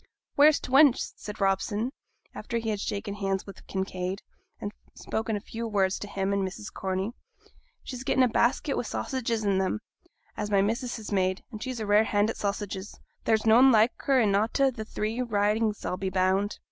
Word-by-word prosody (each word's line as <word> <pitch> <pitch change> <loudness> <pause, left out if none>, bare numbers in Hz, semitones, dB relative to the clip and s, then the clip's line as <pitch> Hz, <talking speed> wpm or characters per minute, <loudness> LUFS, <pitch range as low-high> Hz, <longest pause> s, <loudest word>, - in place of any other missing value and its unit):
'Where's 295 +1 +6
t' - - -8
wench?' 275 -1 +5
said 210 +1 -8
Robson, 205 +4 0 0.4
after 235 - -4
he 225 -1 -2
had 210 - -2
shaken 200 0 -3
hands 195 -1 -2
with 195 - -12
Kinraid, 190 0 -3 0.4
and 205 - -4 0.2
spoken 220 0 -2
a - - -2
few 230 +3 -6
words 195 -3 +1
to 205 - -6
him 195 0 -1
and 200 -1 +1
to 190 - -2
Mrs. 205 +2 -9
Corney. 190 +3 -2 0.7
'She's 255 -1 -6
getten' 265 -1 +3
a - - +5
basket 245 +4 +1
wi' - - 0
sausages 235 -1 -2
in 195 -1 +2
'em, 190 +3 -1 0.6
as 210 -1 -3
my 200 -1 +3
missus 235 +4 -1
has 215 -2 -8
made, 185 -1 +1
and 215 -2 -8
she's 255 -1 -4
a 215 - -3
rare 210 +2 +4
hand 205 +1 +2
at - - -9
sausages; 200 -1 -4 0.3
there's 220 -1 +2
noane 240 +4 +7
like 225 +1 +5
her 270 -2 +2
in 210 -4 +3
a' 205 +2 +3
t' 275 +2 +2
three 220 0 -3
Ridings, 215 -1 0
I'll 180 - -2
be 190 0 -2
bound!' 190 +2 +1
210 Hz, 195 wpm, -27 LUFS, 195-230 Hz, 0.7 s, noane